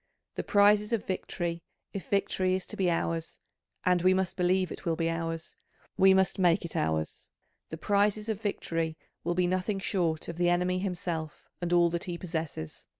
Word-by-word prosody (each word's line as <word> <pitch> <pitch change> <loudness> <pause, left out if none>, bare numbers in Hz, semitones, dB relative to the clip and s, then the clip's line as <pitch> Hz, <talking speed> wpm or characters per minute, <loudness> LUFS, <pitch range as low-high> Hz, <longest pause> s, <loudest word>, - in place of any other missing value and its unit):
The - - -3
prizes 210 +1 +4
of 225 - 0
victory, 170 -2 -3 0.3
if 195 - -6
victory 185 -2 +1
is 185 -1 -3
to - - -6
be 185 -2 +1
ours 165 -1 -1 0.5
and 180 -1 +3
we 185 +1 +5
must 190 -1 -1
believe 185 0 +2
it - - -7
will 165 -2 0
be 165 0 0
ours, 165 0 -4 0.4
we 190 0 +6
must 190 0 +3
make 175 -2 +3
it 170 - -7
ours 80 0 -1 0.4
the 160 - -6
prizes 205 +3 +1
of 220 -2 -2
victory 165 -6 -2 0.3
will 175 +1 -1
be 180 0 +2
nothing 185 +3 0
short 175 -5 -1
of 170 - -6
the 175 0 +3
enemy 180 +1 +1
himself 175 -4 -4
and 175 0 -2
all 175 -1 +5
that 170 0 -2
he 175 -1 -4
possesses. 160 - -5
175 Hz, 185 wpm, -29 LUFS, 165-190 Hz, 0.5 s, we